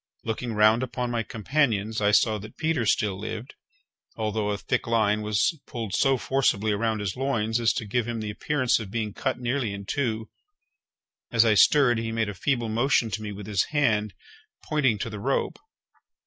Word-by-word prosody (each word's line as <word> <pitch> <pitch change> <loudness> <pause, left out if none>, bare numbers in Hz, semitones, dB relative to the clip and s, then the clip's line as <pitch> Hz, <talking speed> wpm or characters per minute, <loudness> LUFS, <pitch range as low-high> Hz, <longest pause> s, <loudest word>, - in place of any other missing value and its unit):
Looking 115 +1 -3
round 110 +2 +4
upon 125 -1 -3
my 120 -1 0
companions, 110 -2 0
I 105 - +3
saw 105 +1 +3
that 110 +2 -11
Peters 155 -9 +1
still 100 -3 -1
lived, 110 +4 -6 0.6
although 105 -1 -1
a 105 - -1
thick 125 +4 -2
line 110 -2 +2
was 105 - 0
pulled 115 -5 -5
so 135 +3 +3
forcibly 115 -5 +1
around 110 +1 0
his 95 -3 -3
loins 120 -4 0
as 115 -1 +3
to 125 -4 -3
give 115 +3 -1
him 120 -1 -3
the 105 -1 -4
appearance 130 +3 +1
of 110 -4 -7
being 110 -1 -3
cut 130 - -2
nearly 125 -3 -1
in 100 0 -8
two; 110 -3 -2 1.0
as 115 -1 +4
I 110 - +5
stirred, 120 +2 +5
he 115 0 -3
made 115 -2 -1
a - - -4
feeble 120 +4 -1
motion 115 0 +1
to 110 - -3
me 105 -1 -5
with 100 0 -8
his 100 -3 +1
hand, 110 -9 0 0.5
pointing 135 -8 +1
to 110 - -4
the 105 - -6
rope. 135 +6 -1
110 Hz, 190 wpm, -26 LUFS, 105-125 Hz, 1.0 s, I